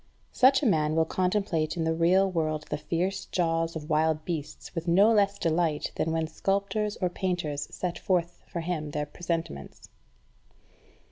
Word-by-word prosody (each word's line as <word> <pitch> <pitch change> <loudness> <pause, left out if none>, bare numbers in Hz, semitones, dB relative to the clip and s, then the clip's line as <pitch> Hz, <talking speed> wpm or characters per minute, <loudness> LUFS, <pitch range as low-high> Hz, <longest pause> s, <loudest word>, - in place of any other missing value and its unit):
Such 265 +3 +5
a - - +2
man 155 -7 +2
will 160 0 +3
contemplate 180 -3 0
in 165 - 0
the 160 0 +1
real 180 +4 +4
world 155 -3 -1
the - - 0
fierce 175 +5 -2
jaws 165 -1 0
of 150 -2 -6
wild 155 0 +2
beasts 155 -4 -5
with 170 0 -4
no 195 +6 +5
less 200 -2 +3
delight 160 -2 0
than 160 - 0
when 160 0 0
sculptors 200 +5 -1
or 185 - 0
painters 175 -5 -2
set 180 -1 -4
forth 175 -2 -1
for 170 - -4
him 160 -3 -3
their 150 0 -2
presentments. 165 - -5
170 Hz, 160 wpm, -28 LUFS, 155-185 Hz, -, Such